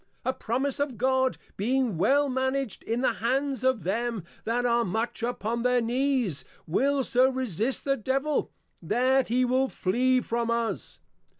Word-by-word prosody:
A 260 Hz, -, +1 dB
Promise 260 Hz, +5 st, -1 dB
of 280 Hz, -5 st, -1 dB
God, 260 Hz, +1 st, +2 dB, 0.2 s
being 245 Hz, +1 st, +1 dB
well 280 Hz, -, +3 dB
managed 260 Hz, -2 st, -1 dB
in 230 Hz, +2 st, -2 dB
the 260 Hz, -, +2 dB
Hands 265 Hz, +2 st, 0 dB
of 260 Hz, -5 st, +2 dB
them 225 Hz, +1 st, -1 dB, 0.2 s
that 240 Hz, +2 st, 0 dB
are 235 Hz, 0 st, +3 dB
much 225 Hz, +5 st, -2 dB
upon 235 Hz, -1 st, -2 dB
their 250 Hz, 0 st, +3 dB
Knees, 245 Hz, -, 0 dB, 0.2 s
will 270 Hz, -, +1 dB
so 255 Hz, +1 st, +3 dB
resist 255 Hz, -1 st, -1 dB
the 275 Hz, -1 st, +1 dB
Devil, 270 Hz, +6 st, -1 dB, 0.3 s
that 260 Hz, +1 st, +2 dB
he 250 Hz, +2 st, +2 dB
will 260 Hz, +2 st, +2 dB
Flee 255 Hz, +7 st, +1 dB
from 235 Hz, -1 st, -2 dB
us. 235 Hz, -1 st, -2 dB
250 Hz, 155 wpm, -27 LUFS, 235-265 Hz, 0.3 s, well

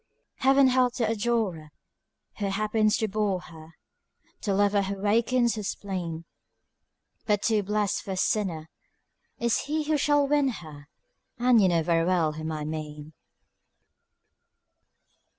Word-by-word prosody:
Heaven 270 Hz, 0 st, +4 dB
help 250 Hz, -1 st, +2 dB
the 230 Hz, -3 st, 0 dB
adorer 215 Hz, -8 st, -1 dB, 0.7 s
Who 200 Hz, -, -1 dB
happens 215 Hz, +2 st, +1 dB
to 220 Hz, -3 st, 0 dB
bore 205 Hz, -2 st, -1 dB
her, 160 Hz, -1 st, -14 dB, 0.7 s
The 200 Hz, -2 st, -1 dB
lover 205 Hz, 0 st, +3 dB
who 195 Hz, 0 st, -3 dB
wakens 230 Hz, +4 st, +2 dB
her -, -, -3 dB
spleen; 180 Hz, -5 st, -5 dB, 1.0 s
But 205 Hz, -2 st, +1 dB
too 220 Hz, -2 st, +2 dB
blest 205 Hz, 0 st, -1 dB
for 195 Hz, -, -5 dB
a -, -, -5 dB
sinner 180 Hz, -6 st, -1 dB, 0.7 s
Is 235 Hz, -1 st, 0 dB
he 305 Hz, +2 st, -1 dB
who 305 Hz, 0 st, +1 dB
shall 290 Hz, 0 st, +2 dB
win 290 Hz, -1 st, +2 dB
her, 155 Hz, -, -7 dB, 0.5 s
And 245 Hz, -2 st, +4 dB
you 190 Hz, -, +5 dB
know 170 Hz, -2 st, +2 dB
very 165 Hz, 0 st, +2 dB
well 170 Hz, -3 st, +1 dB
whom 155 Hz, +1 st, -5 dB
I 155 Hz, -1 st, -4 dB
mean. 150 Hz, 0 st, -6 dB
205 Hz, 135 wpm, -26 LUFS, 165-235 Hz, 1.0 s, you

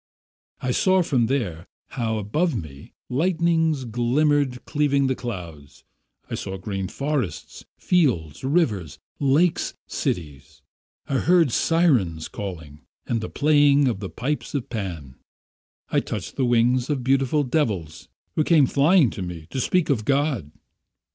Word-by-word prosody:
I 125 Hz, -, -1 dB
saw 185 Hz, +7 st, +3 dB
from 125 Hz, -8 st, +1 dB
there 100 Hz, -, -2 dB, 0.2 s
how 115 Hz, -4 st, -2 dB
above 145 Hz, -, 0 dB
me 75 Hz, -9 st, -8 dB, 0.2 s
lightnings 160 Hz, -1 st, +1 dB
glimmered 125 Hz, +3 st, +1 dB
cleaving 140 Hz, -2 st, +1 dB
the 130 Hz, -, +1 dB
clouds; 85 Hz, -, -8 dB, 0.4 s
I -, -, -7 dB
saw 95 Hz, 0 st, -4 dB
green 95 Hz, 0 st, -4 dB
forests, 140 Hz, -, -4 dB
fields, 120 Hz, -, +1 dB
rivers, 125 Hz, -, 0 dB, 0.2 s
lakes, 150 Hz, +5 st, +2 dB
cities; 75 Hz, -6 st, -4 dB, 0.4 s
I 135 Hz, -, 0 dB
heard 170 Hz, -5 st, +4 dB
syrens 120 Hz, -, +1 dB
singing, 80 Hz, -7 st, -7 dB, 0.2 s
and 115 Hz, -2 st, -1 dB
the 110 Hz, -, -5 dB
playing 145 Hz, -1 st, +4 dB
of 115 Hz, -6 st, -1 dB
the 100 Hz, -2 st, -5 dB
pipes 145 Hz, +4 st, -3 dB
of 130 Hz, -4 st, -3 dB
Pan; 85 Hz, -, -5 dB, 0.7 s
I -, -, +3 dB
touched -, -, -5 dB
the 130 Hz, -, +1 dB
wings 120 Hz, +1 st, +2 dB
of 140 Hz, -4 st, -1 dB
beautiful 135 Hz, +3 st, +2 dB
devils 105 Hz, -, -2 dB, 0.3 s
who 155 Hz, -, +1 dB
came 155 Hz, -3 st, +5 dB
flying 145 Hz, -, +4 dB
to -, -, -7 dB
me 90 Hz, -3 st, -6 dB
to 130 Hz, -, -2 dB
speak 180 Hz, +2 st, +1 dB
of 115 Hz, -6 st, 0 dB
God... 135 Hz, -, 0 dB
125 Hz, 135 wpm, -23 LUFS, 95-150 Hz, 0.7 s, came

